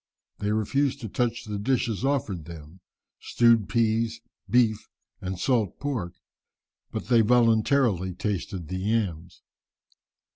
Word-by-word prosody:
They 105 0 -1
refused 135 +6 0
to 115 - -4
touch 120 +2 -1
the 105 -2 -4
dishes 120 -1 0
offered 115 - -1
them, 80 +1 -11 0.4
stewed 115 -3 +3
peas, 115 -1 +1 0.3
beef, 115 -1 +2 0.3
and 95 0 -4
salt 110 -3 0
pork, 120 -12 -3 0.8
but - - -4
they 120 -2 +4
voluntarily 115 -4 +3
tasted 95 -3 -3
the 95 +3 -4
yams. 95 -5 -2
110 Hz, 115 wpm, -26 LUFS, 95-120 Hz, 0.8 s, they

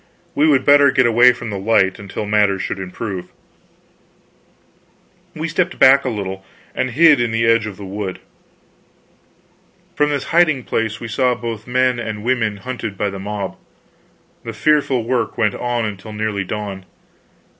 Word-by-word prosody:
We 150 +2 +2
would 140 -4 +3
better 145 0 +6
get 130 -1 +3
away 120 +2 +6
from 120 -2 -7
the 100 - -4
light, 95 -2 +2
until 100 +1 -6
matters 105 -2 +1
should 100 - -4
improve. 95 0 -6 2.1
We 155 +1 -3
stepped 175 +3 -1
back 135 +1 +6
a - - 0
little, 95 -4 -5 0.3
and 130 - -1
hid 150 +1 +5
in 120 - 0
the 115 +1 0
edge 115 -1 +3
of 100 -3 -8
the 100 - -9
wood. 95 -1 -5 1.8
From 150 0 +1
this 145 -2 -1
hiding 155 -6 +3
place 115 -1 -2
we 115 - -6
saw 125 +3 +1
both 115 -2 -6
men 125 0 +1
and 110 -2 -5
women 115 -4 0
hunted 115 -3 -6
by 100 0 -1
the 100 - -7
mob. 100 -1 -5 0.9
The - - -6
fearful 145 -5 +1
work 120 0 -2
went 105 -3 +1
on 120 -1 -2
until 105 +1 -7
nearly 105 -2 -2
dawn. 100 -2 -6
115 Hz, 160 wpm, -19 LUFS, 105-130 Hz, 2.1 s, better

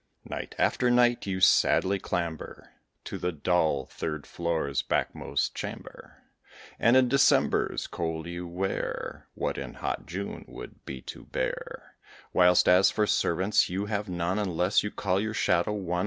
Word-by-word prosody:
Night - - -6
after 125 - +2
night 120 -2 +3
you 95 -1 -1
sadly 95 +1 +4
clamber 85 -3 -4 0.3
To - - -6
the 90 - -1
dull 80 -4 +1
third 75 +1 -5
floor's 80 -5 -1
backmost - - -1
chamber; - - -8 0.6
And 120 +3 +5
in 130 -1 +5
December's 140 +3 +3
cold 80 -1 -4
you 85 +1 -6
wear 95 +3 -4
What - - -2
in - - -7
hot - - -4
June 100 +4 -5
would - - -11
be 65 -2 -6
too - - -9
bare; - - -5 0.4
Whilst 90 -1 +5
as 90 +2 +6
for 105 - +1
servants, 95 +1 +2
you 95 +3 -2
have 105 -1 -3
none, 90 +3 -1
Unless 90 -1 +2
you 105 - -3
call 95 -2 -1
your 110 +1 -3
shadow 85 +1 +2
one. 90 -4 -2
90 Hz, 150 wpm, -28 LUFS, 85-105 Hz, 0.6 s, as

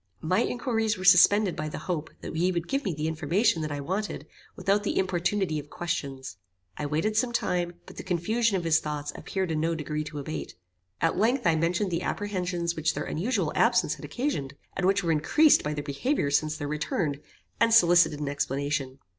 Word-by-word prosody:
My 180 +6 +1
inquiries 225 -3 0
were 185 - -7
suspended 190 +2 +6
by 155 0 -3
the - - -6
hope 165 -4 -3
that - - -7
he 175 +3 +2
would 170 -1 -3
give 275 +1 -1
me 190 - 0
the 155 +1 -2
information 165 +5 +1
that 155 -1 -3
I 145 - -3
wanted 190 +8 -3 0.3
without 200 +1 +1
the 205 - -2
importunity 180 -2 0
of 145 0 -10
questions. 135 - -4 0.4
I 145 - -3
waited 160 +9 0
some 240 +2 +1
time, 175 -6 -1
but - - -13
the - - -4
confusion 200 +4 +1
of 175 - -3
his 160 -1 +3
thoughts 150 -1 -4
appeared 190 -3 -3
in 155 - 0
no 165 +1 0
degree 150 -1 -3
to 150 - -7
abate. 150 +2 -5 0.5
At 165 +2 +1
length 240 +5 +2
I 165 -2 +4
mentioned 170 +4 0
the 170 0 -1
apprehensions 180 -5 -2
which 160 +1 0
their - - -2
unusual 215 +11 -1
absence - - +3
had - - -11
occasioned, 240 - -3 0.2
and 190 -1 +1
which 195 0 +2
were 165 - +1
increased 290 - +4
by 150 0 -2
their 145 - -4
behaviour 145 - -1
since 155 +2 +1
their 145 -1 -4
return, 150 - -1 0.4
and 230 0 +4
solicited 175 -8 +5
an 150 - -3
explanation. 140 -1 -2
170 Hz, 200 wpm, -27 LUFS, 150-200 Hz, 0.5 s, suspended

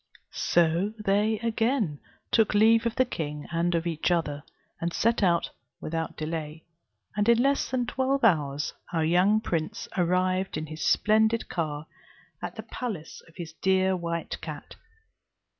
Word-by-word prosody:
So 175 +4 +2
they 210 +1 +1
again 225 - 0 0.3
took 220 -1 +3
leave 225 +2 +5
of 230 - -3
the 255 - +3
king 150 -10 -5
and 170 +1 +1
of 165 0 0
each 165 -1 0
other, 150 -5 0 0.4
and 170 +1 -1
set 230 +6 +1
out 175 -3 +2 0.3
without 165 +1 -4
delay, 155 0 -5 0.5
and 210 +2 +2
in 235 - +6
less 275 +3 +2
than 255 -2 0
twelve 265 +3 0
hours 150 -8 +2 0.2
our 160 -2 +1
young 185 +6 +4
prince 160 -6 -3
arrived 185 0 +1
in 155 - -3
his 155 0 -8
splendid 220 +2 +3
car 155 -3 -3 0.6
at - - -5
the - - -6
palace 205 -11 -6
of 165 - -20
his 165 -2 -7
dear 190 +2 +2
white 170 -1 -4
cat. - - -8
180 Hz, 150 wpm, -27 LUFS, 160-220 Hz, 0.6 s, in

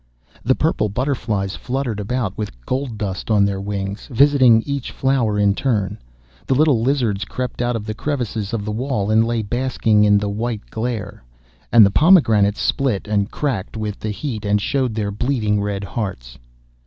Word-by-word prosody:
The 130 +2 +3
purple 150 -9 0
butterflies 105 -5 -2
fluttered 125 -4 -3
about 105 -1 -2
with 105 - -6
gold 130 -4 -3
dust 100 -2 -4
on 105 -2 +4
their 100 -1 -2
wings, 100 0 -4
visiting 130 -3 +5
each 140 -2 -3
flower 130 -6 0
in 100 -1 +3
turn; 105 -5 -1 0.5
the 135 - +2
little 145 -5 +3
lizards 120 -6 0
crept 125 +4 -4
out 120 0 0
of 110 -2 -4
the 110 - -3
crevices 115 -5 -3
of 110 -3 -3
the 105 - -3
wall, 110 -3 -1
and 110 +1 +5
lay 115 -1 -1
basking 115 -2 +1
in 105 -1 +5
the 100 0 -1
white 110 +1 -3
glare; 110 - -4 0.5
and 115 -3 +8
the 100 - +2
pomegranates 110 - +4
split 125 -8 0
and 105 -1 0
cracked 115 -8 -3
with 105 -2 -4
the 110 - -4
heat, 110 0 -4
and 105 0 +2
showed 130 +1 -1
their 105 -2 -2
bleeding 105 -2 0
red 100 -1 -3
hearts. 95 - -5
110 Hz, 175 wpm, -20 LUFS, 100-130 Hz, 0.5 s, and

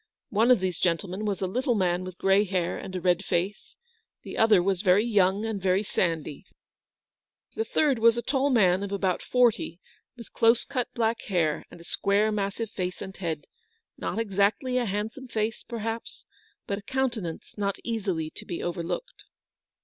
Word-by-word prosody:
One 220 +4 +3
of 245 -6 +6
these 185 -2 -1
gentlemen 185 +4 -1
was 200 -2 -1
a - - +1
little 245 +5 0
man 180 -2 +1
with 185 -1 -8
grey 195 +1 +4
hair 185 -4 -1
and 185 - -7
a - - -1
red 180 +1 +2
face; 185 +3 -2 0.5
the - - -7
other 215 -5 +5
was 190 -1 +1
very 200 +2 +4
young 200 -2 +2
and 220 -3 -3
very 190 +2 +2
sandy; 165 -5 -1 1.1
the 445 - -1
third 285 - +2
was 230 +1 +5
a 235 - -2
tall 270 +2 +1
man 190 -7 +4
of 200 -1 -4
about 190 -2 0
forty, 235 -8 +2 0.4
with 235 - -12
close 230 +1 +4
cut 255 -3 -2
black 230 0 +1
hair, 165 -6 0
and - - -13
a - - -12
square 200 +5 +1
massive 205 +1 -2
face 180 -2 -3
and 190 0 -7
head, 165 -5 -3 0.5
not - - -4
exactly 215 +4 +1
a 245 - 0
handsome 215 +6 -3
face, 220 -1 -2
perhaps, 230 0 -5 0.4
but 200 0 -2
a - - -12
countenance 235 -7 -3
not 200 -1 -1
easily 190 -9 -2
to - - -9
be 175 - -5
overlooked. 175 - -4
200 Hz, 175 wpm, -27 LUFS, 185-230 Hz, 1.1 s, of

